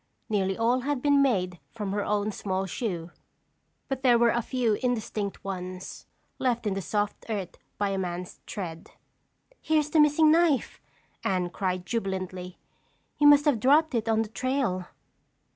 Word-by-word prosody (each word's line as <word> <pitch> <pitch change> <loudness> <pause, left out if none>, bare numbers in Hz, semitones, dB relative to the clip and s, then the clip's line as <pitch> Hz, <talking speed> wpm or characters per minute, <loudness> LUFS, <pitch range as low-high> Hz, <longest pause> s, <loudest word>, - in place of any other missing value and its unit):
Nearly 195 -3 0
all 235 +3 +2
had 280 +1 -1
been 285 -1 +4
made 185 -10 +1
from 210 -4 -5
her 205 0 -1
own 210 +1 0
small 190 -1 -2
shoe, 180 -5 -4 0.8
but 270 -1 -3
there 245 -3 +5
were 235 0 +4
a 240 - +1
few 240 -2 0
indistinct 220 -5 -2
ones, 185 -1 -6 0.3
left 240 -3 0
in 205 - +1
the 195 - -3
soft 205 +4 -2
earth 200 -5 -3 0.2
by 205 -1 0
a 195 -1 -1
man's 180 -1 -5
tread. 170 -5 -6 0.7
"Here's 305 -1 +1
the 320 - +4
missing 300 +1 +5
knife!" 325 -4 +2 0.4
Anne 180 -2 0
cried 185 -2 -2
jubilantly. 185 -4 -4 0.6
"You 295 - +6
must 290 0 +7
have 285 -7 +3
dropped 295 +6 +4
it 225 -1 0
on 225 0 +3
the 215 - -9
trail." 245 -7 -1
215 Hz, 160 wpm, -27 LUFS, 190-260 Hz, 0.8 s, must